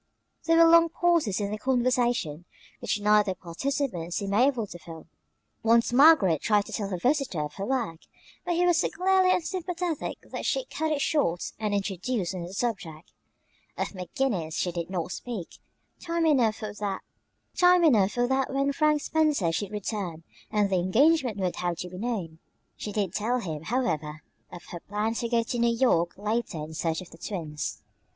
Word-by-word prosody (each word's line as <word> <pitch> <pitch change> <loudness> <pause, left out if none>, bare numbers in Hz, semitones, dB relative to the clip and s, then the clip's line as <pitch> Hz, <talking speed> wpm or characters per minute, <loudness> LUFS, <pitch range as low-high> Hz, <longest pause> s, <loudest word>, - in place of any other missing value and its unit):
There 330 0 +4
were 335 - +8
long 335 0 +6
pauses 330 - +1
in 200 -1 -2
the 215 - -4
conversation, 245 - 0 0.3
which - - -1
neither 210 -2 +3
participant 180 - -3
seemed 200 -1 -2
able 245 +1 +3
to 175 -3 -10
fill. 165 -1 -11 0.6
Once 230 +1 +3
Margaret 250 - +6
tried 210 -2 +2
to - - -10
tell 200 -2 -2
her 185 - -2
visitor 255 - 0
of 150 - -6
her 195 - -5
work, 235 -11 -1 0.4
but 350 - -1
he 355 +1 +2
was 350 -2 +4
so - - +1
clearly 375 0 +3
unsympathetic 355 -2 -2
that - - -7
she - - 0
cut 315 -9 -2
it 290 -2 0
short 225 - 0
and 210 -2 -1
introduced 195 0 -2
another 175 -1 -6
subject. 195 -7 -4 0.7
Of - - -1
McGinnis 185 - -2
she 180 - -1
did 170 0 -4
not 180 -2 -3
speak; 220 -7 -6 0.4
time 335 -1 -1
enough 250 -9 +3
for 215 -2 -6
that 245 - +1
when 275 +1 +1
Frank 305 0 +2
Spencer 300 - +1
should 195 +4 -2
return 200 -5 -4 0.3
and 210 -2 +1
the 185 - +3
engagement 245 - +3
would 185 -2 -2
have 175 -1 -2
to 180 - -5
be 180 +1 -9
known. 195 -9 -3 0.4
She 210 - -6
did 200 -4 -1
tell 225 +5 0
him, 160 -7 -5
however, 155 - -2 0.3
of 175 - -10
her 175 - -6
plans 210 +5 -2
to 235 - -2
go 230 -1 +2
to 240 +1 -3
New 235 0 +2
York 175 -9 +2
later 215 -2 -2
in 155 +1 -6
search 160 +1 -2
of 185 - -12
the 165 - -14
twins. 155 -7 -5
215 Hz, 175 wpm, -27 LUFS, 180-270 Hz, 0.7 s, were